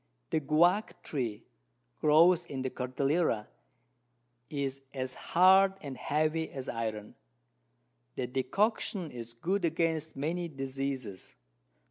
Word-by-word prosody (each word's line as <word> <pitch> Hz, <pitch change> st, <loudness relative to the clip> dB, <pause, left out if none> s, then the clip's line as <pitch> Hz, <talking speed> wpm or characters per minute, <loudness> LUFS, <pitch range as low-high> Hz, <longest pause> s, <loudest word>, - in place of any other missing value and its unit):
The -, -, +2 dB
Guyac 170 Hz, +8 st, +2 dB
Tree 120 Hz, -8 st, -3 dB, 0.6 s
grows 170 Hz, +3 st, +5 dB
in 135 Hz, -2 st, -4 dB
the 130 Hz, -, -2 dB
Cordillera, 130 Hz, -1 st, 0 dB, 1.0 s
is 135 Hz, -2 st, -3 dB
as 130 Hz, -1 st, -3 dB
hard 190 Hz, +6 st, +5 dB
and 140 Hz, -2 st, -5 dB
heavy 155 Hz, +4 st, 0 dB
as 135 Hz, -2 st, -7 dB
Iron: 110 Hz, -2 st, -4 dB, 1.0 s
The 130 Hz, -, -2 dB
Decoction 170 Hz, -, 0 dB
is 115 Hz, -1 st, -8 dB
good 180 Hz, +11 st, -1 dB
against 160 Hz, -1 st, 0 dB
many 165 Hz, +5 st, -2 dB
Diseases. 135 Hz, -, -5 dB
140 Hz, 105 wpm, -31 LUFS, 130-170 Hz, 1.0 s, grows